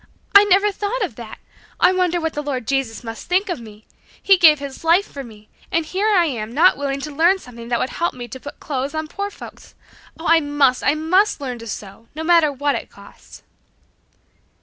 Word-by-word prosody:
I 400 +1 +9
never 405 +1 +3
thought 415 +4 -3
of 355 - -3
that! 230 -2 -9 0.4
I 370 - +5
wonder 360 -2 +1
what 320 -1 -2
the 295 - -3
Lord 270 -5 -4
Jesus 270 -5 -2
must 225 -1 -8
think 380 +3 +1
of 350 - -3
me. 215 -1 -14 0.3
He 395 - +5
gave 320 -4 +6
His 280 0 -8
life 340 +5 +4
for 275 - -8
me, 215 -3 -14 0.2
and 330 -1 0
here 380 +6 -1
I 385 -5 +4
am 230 -7 -4
not 350 +5 +5
willing 275 -1 -3
to 300 +1 -6
learn 340 +6 +3
something 235 -8 -12
that 240 0 0
would 255 - -2
help 340 -4 -2
me 245 -1 -7
to 260 - -8
put 285 - -10
clothes 275 +1 -4
on 315 0 -3
poor 400 +5 -4
folks! - - -13 0.4
Oh, 325 - -8
I 330 +1 +6
must! 290 -4 +1
I 285 - +2
must 365 +7 +2
learn 255 -4 -5
to 230 - -9
sew, 205 +1 -8
no 315 - -4
matter 330 -3 +4
what 285 +1 -1
it - - -5
costs." - - -16
300 Hz, 220 wpm, -20 LUFS, 255-355 Hz, 0.4 s, I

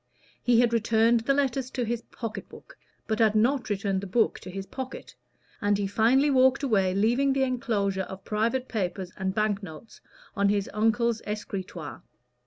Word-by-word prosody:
He 240 -1 +4
had 235 -1 +2
returned 230 +1 +3
the 240 +5 +1
letters 270 -2 0
to 250 -2 -2
his 235 +1 -2
pocket 215 -4 -7
book - - -14 0.3
but 220 0 -2
had 220 -2 +4
not 245 +4 +2
returned 195 -2 -1
the 200 - -6
book 220 +4 +1
to - - -10
his 195 +1 -6
pocket, 260 +4 -7 0.5
and 205 -1 +2
he 200 - -1
finally 235 +8 +3
walked 260 +1 +4
away 195 -8 +2
leaving 240 +7 +2
the 270 0 +1
enclosure 210 -7 0
of 190 0 -9
private 230 +5 0
papers 185 -3 -3
and 190 0 -3
bank 215 -1 +1
notes 180 +3 -11 0.3
on 200 -1 +2
his 200 -1 0
uncle's 225 +2 +1
escritoire. 190 -6 -5
220 Hz, 175 wpm, -27 LUFS, 200-245 Hz, 0.5 s, He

